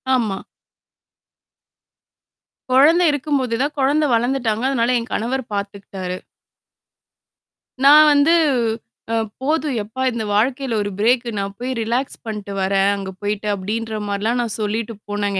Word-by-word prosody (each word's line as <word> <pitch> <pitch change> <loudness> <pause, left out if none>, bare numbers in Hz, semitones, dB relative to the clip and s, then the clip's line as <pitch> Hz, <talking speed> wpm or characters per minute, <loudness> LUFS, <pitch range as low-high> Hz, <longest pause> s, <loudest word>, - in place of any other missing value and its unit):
ஆமா. 215 -6 0 2.3
குழந்தை 320 +7 +5
இருக்கும்போது 280 -5 -1
தான், 290 +2 0
குழந்தை 290 +3 +2
வளர்ந்துட்டாங்க. 240 -2 0
அதனால 250 -2 +1
என் 230 - -7
கணவர் 255 +4 -1
பார்த்துக்கிட்டாரு. 200 -2 -5 1.7
நான் 300 +2 +9
வந்து 285 +3 +4 0.8
அ - - +2 0.3
"போதும் 300 0 0
எப்பா! 220 +5 -7
இந்த 230 -2 -3
வாழ்க்கையில 255 +3 0
ஒரு 205 - -2
பிரேக்கு 240 +3 +2
நான் 195 0 -3
போய் 250 +1 -3
ரிலாக்ஸ் 240 +4 -1
பண்ட்டு 210 -3 -5
வர்றேன், 195 +1 +2
அங்க 195 -1 -5
போயிட்டு", 210 +1 -2
அப்பிடின்ற 215 +3 -3
மாரிலாம் 210 +4 -1
நான் 230 -3 -1
சொல்லிட்டு 215 +2 -2 0.2
போனேங்க 205 -1 -1
230 Hz, 120 wpm, -20 LUFS, 205-265 Hz, 2.3 s, நான்